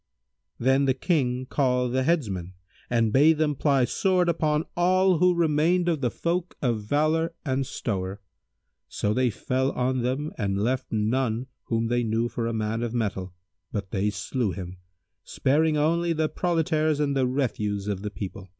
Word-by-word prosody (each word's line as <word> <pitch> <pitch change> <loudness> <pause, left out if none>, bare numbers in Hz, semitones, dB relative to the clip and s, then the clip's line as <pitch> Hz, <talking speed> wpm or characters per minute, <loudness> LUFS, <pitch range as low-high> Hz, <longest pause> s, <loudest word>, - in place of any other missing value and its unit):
[FN#165] - - -7
Then 135 +1 +4
the 130 - +3
King 130 -5 0
called 125 -3 +1
the 130 - +2
headsmen 105 - -1 0.4
and 115 -3 +1
bade 150 +4 +5
them 155 -1 +1
ply 135 -2 +2
sword 180 +3 +1
upon 155 -1 +1
all 185 0 +3
who 180 0 +4
remained 170 +2 +2
of 165 -5 0
the 125 - +1
folk 170 +6 -2
of 120 -5 0
valour 155 +8 +1
and 135 -1 0
stowre: 95 -3 -3 0.7
so 105 - -1
they 125 +1 +2
fell 130 +4 -1
on 130 0 0
them 130 +5 -2
and 100 -2 0
left 130 +3 -1
none 115 +2 0 0.2
whom 115 0 0
they 120 +1 +1
knew 115 +1 0
for 115 -1 -3
a - - -1
man 110 +1 -2
of 120 0 -3
mettle 95 -5 -2 0.4
but 100 -3 -4
they 100 +1 0
slew 105 +4 -2
him, 90 -1 -7 0.5
sparing 155 +3 +1
only 170 +3 +2
the 155 -1 +1
proletaires 155 -2 0
and 140 -2 0
the 130 -2 +2
refuse 105 -6 -1
of 100 -2 -2
the 105 - -3
people. 95 -2 -7
130 Hz, 170 wpm, -26 LUFS, 110-155 Hz, 0.7 s, bade